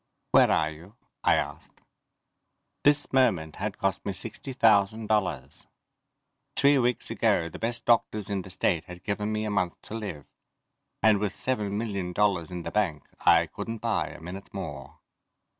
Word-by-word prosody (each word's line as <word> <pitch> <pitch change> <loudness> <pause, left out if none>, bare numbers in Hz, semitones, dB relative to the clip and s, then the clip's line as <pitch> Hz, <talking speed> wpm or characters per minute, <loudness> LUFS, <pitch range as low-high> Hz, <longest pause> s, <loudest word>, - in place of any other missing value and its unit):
"Where - - +6
are 80 0 +2
you?" 85 +7 -13 0.3
I - - +5
asked. - - -4 1.0
This 145 -1 +3
moment 95 - +2
had 105 0 -3
cost 95 -2 -1
me 100 - -2
sixty 115 +6 -6
thousand 110 -3 +3
dollars. 105 -2 -1 0.9
Three 140 0 +5
weeks 125 -1 0
ago 85 - +2
the - - -10
best 115 +1 -2
doctors 110 -3 +2
in 100 -2 -2
the 95 - -11
state 85 -2 0
had 90 -1 -11
given 105 +1 -2
me 110 0 -1
a 105 - -2
month 90 -4 -1
to - - -9
live. 100 -10 -5 0.8
And 110 -2 +5
with 105 -1 -2
seven 105 -6 -1
million 100 -5 -3
dollars 95 -5 +1
in 90 -1 -5
the - - -5
bank 90 -8 0
I - - +5
couldn't 115 0 -6
buy 115 0 0
a - - -10
minute 90 +4 -8
more. 75 -9 -7
100 Hz, 165 wpm, -27 LUFS, 90-110 Hz, 1.0 s, Where